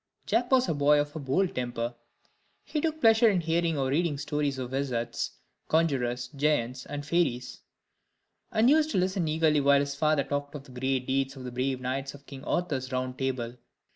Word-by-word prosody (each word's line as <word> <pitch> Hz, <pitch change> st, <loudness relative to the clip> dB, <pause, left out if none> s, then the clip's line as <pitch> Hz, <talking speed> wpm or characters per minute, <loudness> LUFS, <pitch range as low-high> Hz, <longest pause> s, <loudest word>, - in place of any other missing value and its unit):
Jack 245 Hz, +1 st, +1 dB
was 260 Hz, -1 st, +4 dB
a -, -, +1 dB
boy 145 Hz, 0 st, +4 dB
of 145 Hz, +1 st, -2 dB
a -, -, -3 dB
bold 150 Hz, +7 st, 0 dB
temper; 120 Hz, -1 st, -3 dB, 0.7 s
he 300 Hz, -, -2 dB
took 315 Hz, 0 st, -1 dB
pleasure 225 Hz, -2 st, +6 dB
in 195 Hz, -4 st, +2 dB
hearing 165 Hz, -1 st, 0 dB
or 135 Hz, -1 st, 0 dB
reading 155 Hz, +1 st, +1 dB
stories 145 Hz, -1 st, -1 dB
of 125 Hz, -1 st, -5 dB
wizards, 120 Hz, -4 st, -2 dB, 0.3 s
conjurors, 130 Hz, -7 st, +1 dB
giants, 130 Hz, -3 st, 0 dB
and 145 Hz, 0 st, -5 dB
fairies; 145 Hz, -6 st, 0 dB, 0.9 s
and 225 Hz, 0 st, +3 dB
used 310 Hz, +3 st, +4 dB
to -, -, -1 dB
listen 185 Hz, -2 st, +1 dB
eagerly 155 Hz, -1 st, +3 dB
while 140 Hz, 0 st, +5 dB
his 140 Hz, 0 st, -1 dB
father 150 Hz, 0 st, +2 dB
talked 145 Hz, +1 st, -3 dB
of 140 Hz, -, -7 dB
the 135 Hz, -, -15 dB
great 130 Hz, +1 st, -1 dB
deeds 135 Hz, +1 st, 0 dB
of 130 Hz, -, -9 dB
the 125 Hz, -, -6 dB
brave 130 Hz, +1 st, -1 dB
knights 135 Hz, +2 st, -3 dB
of 140 Hz, 0 st, -16 dB
King 135 Hz, -1 st, -10 dB
Arthur's 140 Hz, -7 st, -1 dB
Round 130 Hz, 0 st, -2 dB
Table. 125 Hz, -2 st, -3 dB
140 Hz, 190 wpm, -28 LUFS, 130-165 Hz, 0.9 s, pleasure